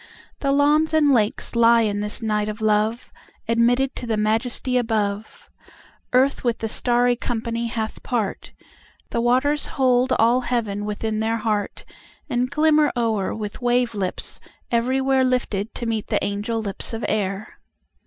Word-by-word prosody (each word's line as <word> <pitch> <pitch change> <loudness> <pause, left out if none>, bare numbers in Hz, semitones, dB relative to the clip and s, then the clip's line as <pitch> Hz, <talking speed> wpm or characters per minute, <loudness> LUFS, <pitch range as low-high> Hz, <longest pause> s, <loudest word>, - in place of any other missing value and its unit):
The 275 - 0
lawns 300 +3 +3
and 295 -3 +4
lakes 220 0 0
lie 235 0 +5
in 205 -1 -1
this 210 +3 -2
night 210 -1 0
of 210 +1 -6
love, 215 +2 0 0.3
Admitted 245 +3 +2
to 245 - -5
the 220 -2 0
majesty 225 +4 0
above. 215 -3 -2 0.6
Earth 265 +3 +2
with 240 -2 0
the 225 - -3
starry 245 +2 +2
company 235 -1 -3
hath 220 -1 -4
part; 225 -6 -3 0.6
The 235 - 0
waters 260 +5 +2
hold 255 -1 +3
all 235 +3 +3
heaven 220 -5 -2
within 215 +1 -3
their 225 +1 0
heart, 215 -2 -2 0.4
And 250 -3 -1
glimmer 305 +1 +3
o'er 220 -5 0
with 215 +2 -6
wave 245 -1 +1
lips 195 -3 -3 0.3
everywhereLifted 255 -3 +1
to 240 - -4
meet 225 -2 -2
the - - 0
angel 205 +3 -2
lips 205 +1 -3
of 225 - -3
air. 195 0 -3
230 Hz, 145 wpm, -22 LUFS, 215-250 Hz, 0.6 s, lie